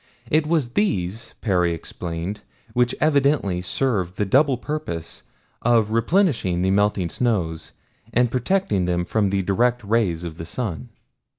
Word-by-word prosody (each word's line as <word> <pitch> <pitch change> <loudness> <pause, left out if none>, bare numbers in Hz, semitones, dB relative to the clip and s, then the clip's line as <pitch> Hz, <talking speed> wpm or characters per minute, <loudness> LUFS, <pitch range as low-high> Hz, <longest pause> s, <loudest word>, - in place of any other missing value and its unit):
It 155 0 +3
was 155 -6 +1
these, 115 - -1
Perry 90 -5 +1
explained, 85 +5 -5 0.3
which 125 +1 +2
evidently 140 - +2
served 95 -3 -1
the 105 - +1
double 135 +6 +3
purpose 85 - -5 0.4
of 115 -3 +3
replenishing 115 - +2
the 95 - +2
melting 100 -3 +1
snows 90 -10 -1 0.4
and 120 0 +2
protecting 125 - +1
them 90 0 0
from 105 +1 +1
the 95 0 0
direct 120 +6 +1
rays 100 -6 +1
of 85 -2 -6
the 80 - -6
sun. 85 - -4
105 Hz, 135 wpm, -23 LUFS, 90-125 Hz, 0.4 s, It